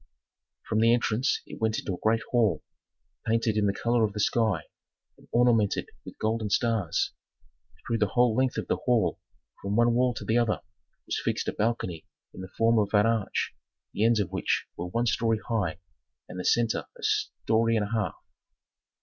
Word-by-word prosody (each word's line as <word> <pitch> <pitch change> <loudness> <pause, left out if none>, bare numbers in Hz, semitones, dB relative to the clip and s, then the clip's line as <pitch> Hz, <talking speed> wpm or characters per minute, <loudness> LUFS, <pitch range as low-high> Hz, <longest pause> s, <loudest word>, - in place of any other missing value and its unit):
From 110 - +1
the 115 +1 +5
entrance 120 +3 0
it - - -11
went 110 0 +1
into 95 - -3
a 90 - -6
great 115 +1 +2
hall, 110 -11 +2 0.6
painted 115 -1 +1
in 105 -1 +2
the - - +3
color 115 +3 +1
of 105 -2 0
the 105 - -5
sky, 110 0 +1 0.5
and - - -21
ornamented 120 -4 +2
with - - -11
golden 110 -1 -1
stars. 110 -6 +1 0.7
Through 115 -1 -1
the 105 - +3
whole 120 0 +3
length 130 0 +1
of - - -2
the - - 0
hall, 120 -6 +1 0.4
from 100 +1 -2
one 120 +1 +4
wall 125 0 +2
to - - -6
the 115 +2 +2
other, 110 -5 0 0.4
was - - -2
fixed - - -1
a - - -4
balcony 105 -7 -2 0.3
in - - -9
the 95 - -8
form 115 0 +4
of 105 0 0
an 105 +1 +5
arch 115 -3 0 0.4
the 105 - 0
ends 115 -1 +4
of 100 -5 -1
which - - 0
were 85 - -4
one 115 +7 -1
story 115 -1 +1
high 95 -9 0 0.5
and 90 - -8
the 90 - -4
centre 115 -2 +2
a - - -14
story 115 +1 +1
and 105 - 0
a - - -11
half. 110 -6 -1
110 Hz, 190 wpm, -27 LUFS, 105-115 Hz, 0.7 s, the